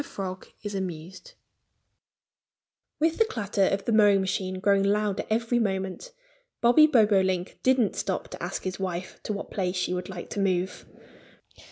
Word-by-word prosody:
FROG 185 -6 -6 0.2
IS 205 -1 -4
AMUSED 190 - -6 1.6
WITH 320 +4 +1
the 450 - +5
clatter 205 - 0
of 195 0 -1
the - - 0
mowing 205 -2 +5
machine 190 -1 -2
growing 200 +1 +3
louder 205 0 +1
every 230 +2 +1
moment, 190 - -2 0.5
Bobby 245 +6 +6
Bobolink 195 - +2
didn't 255 -5 +2
stop - - -2
to - - -9
ask - - -4
his 185 0 -4
wife 185 -1 -4
to - - -4
what 205 - -5
place 185 -2 -1
she 180 0 -1
would 180 +1 -4
like 180 -2 -8
to - - -3
move. 185 -1 -1
195 Hz, 155 wpm, -27 LUFS, 185-220 Hz, 1.6 s, Bobby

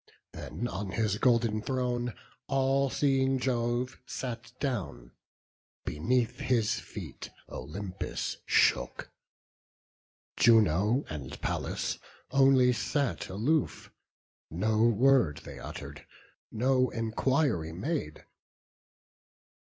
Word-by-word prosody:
Then 120 - -5
on 100 -4 -4
his 105 -2 0
golden 115 -4 +3
throne 125 -1 -1 0.3
all 135 0 +2
seeing 135 -1 +2
Jove 125 0 -1
Sat 125 -1 -5
down; 90 - -3 0.7
beneath 115 +10 0
his 120 -4 +1
feet - - -8 0.2
Olympus 90 +8 -5
shook. - - +2 1.3
Juno 110 - +4
and 75 -2 -7
Pallas - - -2 0.3
only 135 -2 +5
sat 125 +4 -1
aloof; 130 +11 0 0.6
No 110 +6 +1
word 120 - +3
they - - -9
utter'd, - - -8 0.4
no 130 +2 +2
enquiry 115 - 0
made. 95 - -4
120 Hz, 85 wpm, -30 LUFS, 105-130 Hz, 1.3 s, only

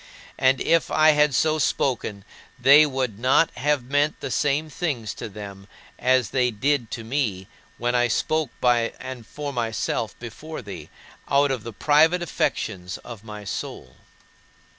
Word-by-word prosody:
And 130 0 +3
if 165 0 +2
I 155 0 +5
had 150 -2 +3
so 155 0 +2
spoken, 115 -8 -1 0.3
they 140 +5 +7
would 130 -6 -3
not 130 +6 +3
have 145 -2 0
meant 145 +4 0
the - - -5
same 150 +2 +1
things 140 - -3
to - - -7
them 100 -1 -9 0.3
as 130 -2 +2
they 125 -2 +2
did 125 +2 0
to 115 - -8
me 110 -7 -2 0.3
when 120 +1 -1
I 120 0 +3
spoke 155 +5 0
by 120 -2 +2
and 130 -3 -8
for 145 -1 -6
myself 115 -3 -2
before 125 +6 -8
thee, 100 -2 -9 0.4
out 140 0 +3
of 130 -4 -2
the 115 - -7
private 155 - +3
affections 95 - -2
of 115 -4 -10
my 105 -1 -9
soul. 65 -9 -6
130 Hz, 155 wpm, -24 LUFS, 110-145 Hz, 0.4 s, they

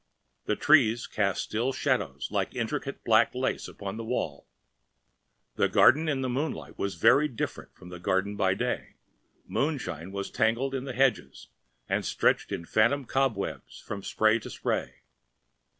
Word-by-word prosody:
The 105 - 0
trees 120 -6 +4
cast 100 -3 0
still 120 +5 -1
shadows - - -1
like - - -1
intricate - - -3
black - - +4
lace - - -1
upon 100 +1 -7
the 115 - -5
wall. 95 - -3 1.1
The - - +2
garden 155 +3 +5
in 140 -3 0
the 130 - -1
moonlight 135 +6 -3
was 100 -2 -2
very 145 - +5
different 120 -6 -5
from 90 - -13
the 90 -1 -8
garden 95 +2 0
by 95 -2 +2
day; 125 +4 -3 0.5
moonshine 125 - -2
was 100 0 -4
tangled 120 +5 +1
in 135 0 -3
the 130 - -5
hedges 120 - 0 0.4
and - - 0
stretched - - +1
in 85 - -4
phantom 120 +9 +2
cobwebs 130 -6 -2
from 100 - -6
spray 110 +3 +2
to - - -9
spray. - - -3
110 Hz, 150 wpm, -28 LUFS, 100-135 Hz, 1.1 s, garden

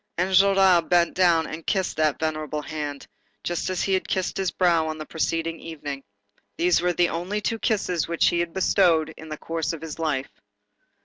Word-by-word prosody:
Enjolras 190 0 +5
bent 175 -1 +3
down 170 -3 +3
and 160 +2 -7
kissed 190 -5 0
that 155 -2 +2
venerable 155 -1 -2
hand, 145 -2 -5 0.4
just 175 0 -2
as 185 - -1
he 195 - 0
had 190 - 0
kissed 185 -1 -1
his 190 -2 0
brow 170 -3 +2
on 155 0 -4
the 155 - -6
preceding 165 +1 -2
evening. 145 -4 -7 0.5
These 175 0 +3
were 175 0 +1
the 175 0 +2
only 180 +6 -3
two 225 +2 -2
kisses 185 -8 0
which 170 0 +2
he 175 - 0
had 170 -1 -1
bestowed 175 -4 +3
in 160 - -11
the 155 - -5
course 165 +1 -3
of 165 - -7
his 160 0 -7
life. 145 -4 -2
165 Hz, 190 wpm, -24 LUFS, 155-180 Hz, 0.5 s, Enjolras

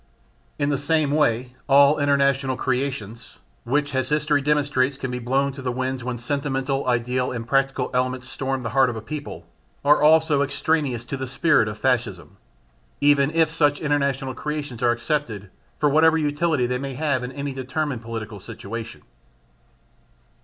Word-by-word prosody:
In 145 - 0
the 140 -2 0
same 150 0 +1
way 125 -4 +1 0.2
all 140 +2 +6
international 140 -2 +2
creations 125 -4 -3 0.3
(which, 145 +4 0
as 130 -1 -1
history 150 -1 +1
demonstrates, 140 -2 +1
can 130 -2 -4
be 125 - -3
blown 135 +3 0
to 135 - -9
the 130 -1 -2
winds 130 0 -3
when 125 0 -3
sentimental, 135 +1 -2
ideal 125 +1 0
and 115 -2 -5
practical 135 0 0
elements 130 0 -1
storm 135 0 -3
the 115 - -3
heart 135 0 +4
of 120 - -4
a 110 - -5
people) 145 +5 -7 0.4
are 145 +1 +5
also 155 -1 +4
extraneous 140 -3 -1
to 135 - -4
the 130 0 -4
spirit 135 -2 +2
of 105 0 -5
Fascism 105 - -1 0.6
even 145 -1 +4
if 160 0 +2
such 145 -3 +2
international 140 -3 0
creations 145 -4 -5
are 120 - +3
accepted 120 -5 -2 0.3
for 150 - +2
whatever 160 +3 +4
utility 150 -2 +1
they 125 +1 -1
may 135 -1 -5
have 140 -3 0
in 125 - -5
any 140 0 -4
determined 130 0 -3
political 110 -2 -6
situation. 115 +4 -8
135 Hz, 160 wpm, -23 LUFS, 125-145 Hz, 0.6 s, all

